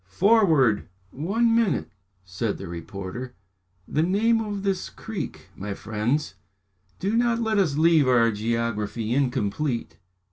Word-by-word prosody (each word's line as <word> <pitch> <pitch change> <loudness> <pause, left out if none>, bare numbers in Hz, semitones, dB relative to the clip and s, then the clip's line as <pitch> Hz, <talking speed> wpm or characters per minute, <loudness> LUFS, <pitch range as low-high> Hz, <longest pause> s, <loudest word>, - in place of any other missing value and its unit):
Forward!" 160 - +3 0.2
"One 220 - +1
minute," 195 - +1 0.3
said 95 +4 -2
the - - -7
reporter. 100 +9 -7 0.5
"The 155 - 0
name 220 +7 +2
of 205 -2 -4
this 195 -2 -1
creek, 185 - -7
my 100 0 -5
friends? 110 +6 -1 0.6
Do 200 +4 -1
not 235 0 +2
let 220 -2 +1
us 160 -8 +2
leave 160 -3 +4
our 120 -2 +4
geography 115 0 -2
incomplete." 125 - -1
135 Hz, 120 wpm, -25 LUFS, -, 0.6 s, leave